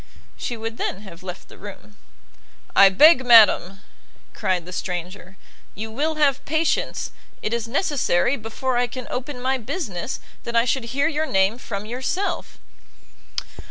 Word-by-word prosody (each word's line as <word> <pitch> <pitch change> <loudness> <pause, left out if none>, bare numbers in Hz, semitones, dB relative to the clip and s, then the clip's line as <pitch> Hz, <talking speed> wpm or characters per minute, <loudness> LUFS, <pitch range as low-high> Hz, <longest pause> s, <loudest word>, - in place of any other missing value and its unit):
She 240 - -4
would 225 +1 -5
then 190 - -2
have 185 -4 -12
left 185 -1 -8
the - - -15
room. 205 +1 -11 0.8
"I 195 0 +9
beg, 260 - +6
madam," 210 -5 +6 0.5
cried 185 -5 -1
the 180 - -9
stranger, 180 +1 -5 0.4
"you 220 +2 -6
will 305 +7 -1
have 285 -3 +2
patience; 315 +2 0 0.3
it 215 - -1
is 235 -1 -2
necessary, 265 - +1
before 240 +2 -3
I 245 0 +2
can 255 +1 -7
open 255 +1 -4
my 260 +1 0
business, 235 - -4 0.2
that 235 - -5
I 230 0 +4
should 250 0 0
hear 275 +6 0
your 315 0 -1
name 195 +3 +2
from 200 -4 -5
yourself." 260 - -3
230 Hz, 150 wpm, -23 LUFS, 195-265 Hz, 0.8 s, I